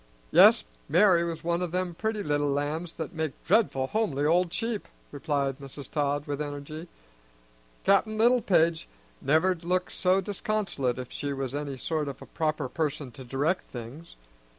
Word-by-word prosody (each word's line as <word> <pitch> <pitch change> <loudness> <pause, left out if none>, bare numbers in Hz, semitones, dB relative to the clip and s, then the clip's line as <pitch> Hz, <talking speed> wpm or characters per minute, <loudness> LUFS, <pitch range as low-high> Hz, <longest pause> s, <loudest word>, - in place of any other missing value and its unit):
"Yes, - - +7 0.3
Mari' 175 +1 +5
was 170 -1 -4
one 170 +1 0
o' 180 - 0
them 180 +1 -2
pretty 220 +3 -2
little 145 -1 +1
lambs 150 +4 -2
that 160 - -6
make 160 -4 -2
dreadful 165 -12 +3
homely 145 -5 0
old 170 +2 +3
sheep," 225 +2 -2 0.2
replied 140 -2 -1
Mrs. 140 0 -8
Todd 145 -1 0
with 145 0 -3
energy. 150 +3 -6 1.0
"Cap'n 215 +2 +3
Littlepage 205 -9 +3 0.3
never'd 165 +4 +2
look 180 +1 0
so 185 +1 +2
disconsolate 195 - -1
if 125 -1 -6
she 145 -1 -3
was 135 -1 -3
any 145 -2 -4
sort 155 +2 -2
of 135 -2 -6
a - - -10
proper 155 -3 -1
person 145 -2 -2
to 130 +1 -10
direct 145 +9 -1
things. 125 +7 -9
160 Hz, 155 wpm, -28 LUFS, 140-180 Hz, 1.0 s, Yes